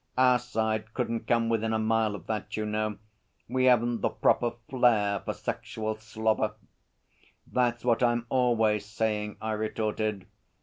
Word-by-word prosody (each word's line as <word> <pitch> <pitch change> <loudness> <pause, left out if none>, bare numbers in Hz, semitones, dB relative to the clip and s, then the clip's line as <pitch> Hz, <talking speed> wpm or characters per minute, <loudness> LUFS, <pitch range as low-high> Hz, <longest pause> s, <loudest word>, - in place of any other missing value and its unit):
Our 125 -1 +5
side 110 -2 -2
couldn't 115 -2 -2
come 115 -1 +2
within 115 -1 0
a - - +2
mile 110 -1 +1
of 90 -4 -10
that, 105 -1 -4
you 110 - -1
know. 105 0 -1 0.5
We 130 +2 +1
haven't 120 -2 +3
the - - +2
proper 120 -1 +2
flair 110 -6 +3
for - - -4
sexual 110 0 -3
slobber.' 110 0 -1 0.9
'That's 120 -1 0
what 120 -1 +3
I'm 120 -1 +2
always 115 -5 +2
saying,' 105 0 -2
I 110 - -2
retorted. 110 -2 -2
110 Hz, 145 wpm, -28 LUFS, 110-120 Hz, 0.9 s, Our